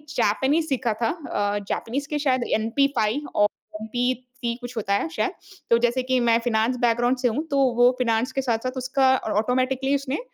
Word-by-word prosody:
Japanese 275 +10 +1
सीखा 255 -5 0
था 230 - +2
अ, 205 - -2
Japanese 275 +5 -3
के 300 - -1
शायद 260 -4 +1
एमपी-फाइव 245 +3 0
और 205 - +5 0.3
एमपी-थ्री 245 +1 -3
कुछ 245 0 -8
होता 200 -2 -1
है, 200 - +1
शायद। 355 +2 -1 0.4
तो 235 - +5
जैसे 240 +2 +1
कि 255 0 +1
मैं 235 -1 +3
फाइनेंस 230 +2 +1
बैकग्राउंड 240 +2 +2
से 250 -1 +1
हूँ, 260 +7 -1
तो 280 - +1 0.2
वो 245 +1 +6
फ़ाइनेंस 230 0 +1
के 270 - -1
साथ-साथ 255 +1 -2
उसका 260 +1 +2
और 215 - -5
ऑटोमैटिकली 260 +3 0
उसने 275 +1 -2
250 Hz, 180 wpm, -24 LUFS, 230-270 Hz, 0.4 s, वो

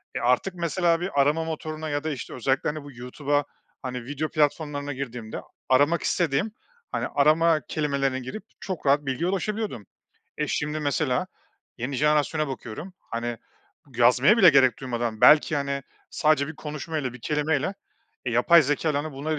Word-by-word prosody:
e, - - -1
artık 125 +10 +1
mesela 170 0 +1
bir 180 -5 -1
arama 150 +4 +2
motoruna 155 -1 -5
ya 145 0 -2
da, 160 - -2
işte, 140 - -6
özellikle, 135 +3 0
hani, 150 0 -5
bu 145 - -10
YouTube'a, 140 +4 -1 0.4
hani, 125 -2 -5
video 145 +3 -3
platformlarına 145 -2 0
girdiğimde 125 -4 -6
a - - -12 0.3
aramak 145 +6 +3
istediğim, 170 +4 0 0.4
hani, - - -1
arama 155 +2 +3
kelimelerine 140 -3 -1
girip 130 - -7 0.2
çok 185 -6 -5
rahat 145 +1 +3
bilgiye 135 +7 -1
ulaşabiliyordum. 195 - -3 0.5
E, 150 - 0
şimdi 150 +1 -2
mesela 145 -3 0 0.5
yeni 130 +4 -3
jenerasyona 150 +1 +2
bakıyorum, 135 - -7
hani, 120 0 -4 0.6
yazmaya 125 - +5
bile 185 -6 +8
gerek 130 -4 +4
duymadan 120 -4 -3
belki, 150 0 +6
hani, 140 -1 -2 0.3
sadece 150 -2 +2
bir 160 - -8
konuşma 155 +1 -5
ile 130 -4 -3
bir 125 - -12
kelimeyle 150 - 0 0.5
e, 125 - -1
yapay 160 +8 +6
zekâyla, 145 +1 0
hani, 155 - -6
bunları 150 +3 -3
145 Hz, 160 wpm, -25 LUFS, 130-155 Hz, 0.6 s, bile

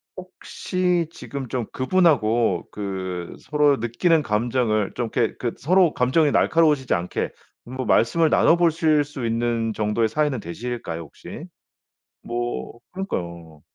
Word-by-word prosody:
혹시 180 -1 -2
지금 140 -5 -7
좀 125 -3 -2
그분하고 120 - +2
그 95 -4 -5
서로 150 -2 +2
느끼는 150 +9 +2
감정을 110 -2 0
좀 120 -2 -2
이렇게 115 - +1
그 120 -2 -3
서로 175 +2 +3
감정이 140 +4 +2
날카로우시지 150 -6 +3
않게 85 +1 -2 0.3
뭐 130 +1 -5
말씀을 160 +8 +3
나눠보실 165 -3 +3
수 140 -4 -6
있는 115 -1 0
정도의 105 +2 0
사이는 145 +1 0
되실까요, 85 -2 -5
혹시? 80 - -10 0.8
뭐 120 0 -4
그러니까요. 85 - -6
120 Hz, 285 characters per minute, -23 LUFS, 110-155 Hz, 0.8 s, 서로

